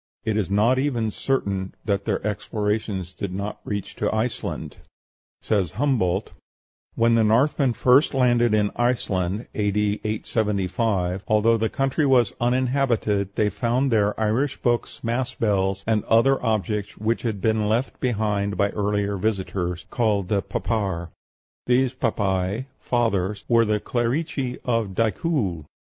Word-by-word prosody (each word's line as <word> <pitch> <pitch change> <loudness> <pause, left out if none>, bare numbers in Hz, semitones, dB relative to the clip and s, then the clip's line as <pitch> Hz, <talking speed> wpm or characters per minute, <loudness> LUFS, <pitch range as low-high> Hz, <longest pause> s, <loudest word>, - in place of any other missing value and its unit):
It 110 -2 0
is 105 -4 0
not 110 +6 +3
even 120 -6 0
certain 100 -7 -2
that 100 -2 0
their - - -1
explorations 105 -3 -2
did 100 0 -5
not 100 +3 -4
reach 100 -2 -4
to - - 0
Iceland. 110 +2 -3 0.7
Says 95 -7 0
Humboldt, 110 -8 0 0.6
"When 115 0 +3
the 115 -1 +4
Northmen 125 +4 +3
first 130 +5 +4
landed 120 -3 +3
in 105 -1 +1
Iceland 105 -4 0
(A.D. 105 0 0
875), 100 -3 -1
although 110 +2 +4
the 110 0 0
country 135 +2 0
was 125 -5 +4
uninhabited, 120 -5 +1
they 105 -1 +1
found 125 +6 0
there 105 -2 +2
Irish 120 +6 0
books, 120 -2 -1
mass 120 +2 -1
bells, 100 -2 0
and 110 -2 +1
other 130 +4 +3
objects 105 -2 -1
which 110 +2 -1
had 110 -4 -2
been 110 0 +1
left 120 +5 -1
behind 105 -5 -1
by 100 0 +2
earlier 105 -1 -1
visitors, 95 -3 -2
called 105 -6 0
Papar; 100 -3 -1 0.6
these 125 +1 +3
papæ 100 -2 -1
(fathers) 105 -5 0
were 115 -1 +4
the 105 -1 +1
clerici 125 +3 -1
of 115 -6 0
Dicuil. 110 - 0
110 Hz, 130 wpm, -24 LUFS, 100-120 Hz, 0.7 s, the